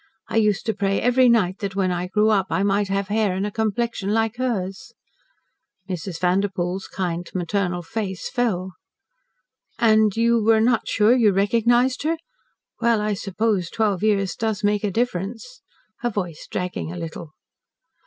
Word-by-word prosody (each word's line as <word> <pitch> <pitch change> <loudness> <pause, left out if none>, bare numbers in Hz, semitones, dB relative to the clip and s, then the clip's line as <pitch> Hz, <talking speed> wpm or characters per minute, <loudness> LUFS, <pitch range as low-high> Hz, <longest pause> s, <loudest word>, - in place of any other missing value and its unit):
I - - -1
used 210 -2 +2
to 220 - 0
pray 195 -1 0
every 250 +1 +4
night 200 -5 +2
that 195 -1 -4
when 190 -2 +1
I 180 0 -2
grew 210 +3 +2
up 195 -3 +2
I 195 - 0
might 200 0 +1
have 195 0 -2
hair 210 -3 +1
and 190 +2 -1
a 210 - -3
complexion 220 -1 -1
like 225 +1 0
hers." 235 -1 -3 0.9
Mrs. 180 -2 -5
Vanderpoel's 185 0 0
kind, 175 -2 -3
maternal 180 0 -1
face 190 0 -4
fell. 190 -8 -1 1.0
"And 215 -2 +3
you 230 -1 +3
were 225 0 +4
not 230 +1 +2
sure 220 +3 +4
you 225 -5 +4
recognised 235 +6 +2
her? 320 +3 0 0.6
Well, 235 -2 +3
I 210 0 0
suppose 200 -2 -1
twelve 210 -4 0
years 200 -4 +1
does 220 -3 -2
make 205 0 +1
a 205 - +1
difference," 225 +3 -3 0.4
her 240 - -1
voice 180 -8 -5
dragging 180 -3 -3
a 180 - -7
little. 165 -1 -7
205 Hz, 160 wpm, -23 LUFS, 185-225 Hz, 1.0 s, every